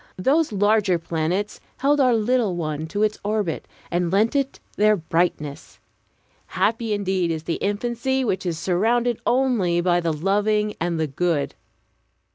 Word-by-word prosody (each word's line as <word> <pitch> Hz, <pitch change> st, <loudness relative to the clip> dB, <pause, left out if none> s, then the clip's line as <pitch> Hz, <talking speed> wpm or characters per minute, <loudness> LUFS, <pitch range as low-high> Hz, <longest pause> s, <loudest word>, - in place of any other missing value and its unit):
Those 285 Hz, -, +2 dB
larger 205 Hz, -2 st, +2 dB
planets 170 Hz, +5 st, -2 dB, 0.2 s
held 290 Hz, +2 st, +2 dB
our 250 Hz, -3 st, +4 dB
little 225 Hz, -3 st, +1 dB
one 155 Hz, -2 st, -3 dB
to 205 Hz, +6 st, -1 dB
its 215 Hz, 0 st, 0 dB
orbit, 205 Hz, -5 st, -2 dB, 0.2 s
and 175 Hz, 0 st, 0 dB
lent 215 Hz, +7 st, +2 dB
it 275 Hz, -1 st, -1 dB, 0.2 s
their 215 Hz, +1 st, +4 dB
brightness. 160 Hz, -3 st, -2 dB, 0.7 s
Happy 225 Hz, 0 st, 0 dB
indeed 190 Hz, -4 st, 0 dB
is 160 Hz, -1 st, -3 dB
the 165 Hz, 0 st, -2 dB
infancy 240 Hz, +6 st, -1 dB
which 190 Hz, -4 st, -1 dB
is 175 Hz, -3 st, -2 dB
surrounded 230 Hz, +7 st, +1 dB
only 240 Hz, -9 st, +2 dB
by 175 Hz, 0 st, +2 dB
the 170 Hz, -1 st, 0 dB
loving 210 Hz, +6 st, +1 dB
and 170 Hz, -1 st, -1 dB
the 160 Hz, -, +1 dB
good! 150 Hz, 0 st, -1 dB
200 Hz, 145 wpm, -23 LUFS, 170-225 Hz, 0.7 s, our